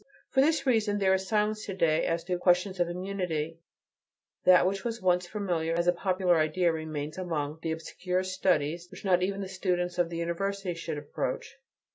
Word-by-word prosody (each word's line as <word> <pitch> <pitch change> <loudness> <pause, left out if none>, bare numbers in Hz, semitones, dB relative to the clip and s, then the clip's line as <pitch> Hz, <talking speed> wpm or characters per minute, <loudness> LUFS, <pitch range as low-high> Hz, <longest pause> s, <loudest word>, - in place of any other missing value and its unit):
For 265 - +4
this 305 0 +2
reason, 220 -5 +2
there 190 -2 +3
is 190 0 0
silence 215 0 +1
to 195 - -4
day 165 -3 +2
as 165 0 -1
to 180 +1 -1
questions 180 +1 +2
of 175 -1 +2
immunity; 175 -4 -3 0.9
that 180 -1 +7
which 195 +1 -1
was 235 -1 -3
once 180 -1 +2
familiar 175 -5 -1
as 170 0 +1
a 175 - +4
popular 180 -1 +2
idea 165 +3 +2
remains 155 0 -4
among 155 -4 -3
the 165 - -2
obscure 180 +3 -2
studies 175 -3 0
which - - -11
not 180 -2 +4
even 195 +2 -1
the 195 - -4
students 180 -2 -1
of 175 -1 +2
the 170 - -5
university 185 +3 -2
should 165 -2 -5
approach. 145 - -4
180 Hz, 185 wpm, -29 LUFS, 165-195 Hz, 0.9 s, that